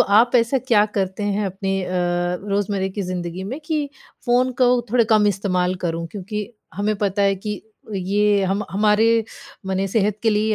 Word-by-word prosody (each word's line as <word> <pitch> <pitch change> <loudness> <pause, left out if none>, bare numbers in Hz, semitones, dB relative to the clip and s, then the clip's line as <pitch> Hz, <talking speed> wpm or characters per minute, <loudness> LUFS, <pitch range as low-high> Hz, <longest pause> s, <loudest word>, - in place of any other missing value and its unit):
आप 225 +5 +4
ऐसा 235 +3 +2
क्या 230 -5 +3
करते 190 +2 -2
हैं 205 0 0
अपनी 195 0 -2
अ, - - -6 0.6
रोज़मर्रा 200 -1 0
की 205 - -1
ज़िंदगी 180 0 -4
में 255 +9 -5
कि 305 -3 -1 0.4
फ़ोन 250 +1 +3
का 255 - +5
वो 245 0 +4
थोड़े 240 0 +4
कम 215 -1 +5
इस्तेमाल 185 -2 0
करूँ? 165 0 -2
क्योंकि 210 +1 -4 0.3
हमें 210 +2 0
पता 200 0 0
है 195 0 +3
कि 210 +2 -5 0.3
ये 200 +2 +2
हम 195 +3 -1
हमारे 210 +3 +3 0.6
मने 190 0 0
सेहत 210 +1 +1
के 225 - +3
लिए 215 +1 +1
205 Hz, 175 wpm, -21 LUFS, 190-220 Hz, 0.6 s, का